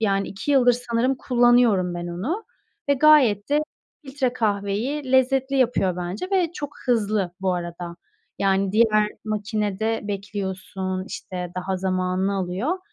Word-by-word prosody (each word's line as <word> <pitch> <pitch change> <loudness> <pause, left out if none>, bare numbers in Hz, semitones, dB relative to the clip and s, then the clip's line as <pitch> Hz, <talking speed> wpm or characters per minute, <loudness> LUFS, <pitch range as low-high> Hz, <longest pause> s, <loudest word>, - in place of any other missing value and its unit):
yani, 195 -2 +1
2 195 +9 -4
yıldır 250 -3 +5
sanırım 240 +2 0
kullanıyorum 240 -8 +3
ben 175 0 -4
onu 245 - -3 0.4
ve 285 - +5
gayet 265 -8 +5
de 295 +1 +3 0.4
filtre 265 -2 -1
kahveyi 225 +6 -1
lezzetli 265 +1 +3
yapıyor 230 -8 +2
bence 180 - -4
ve 355 -4 +2
çok 290 -1 -5 0.2
hızlı 210 -6 +1
bu 185 -1 +1
arada. 175 0 -6 0.4
Yani, 195 0 +1
diğer 215 -1 +4 0.2
makinede 215 0 -1
bekliyorsun, 190 -2 -4
işte, 180 -1 -6
daha 190 +1 -2
zamanını 185 +1 0
alıyor 195 - -2
210 Hz, 130 wpm, -23 LUFS, 190-250 Hz, 0.4 s, yıldır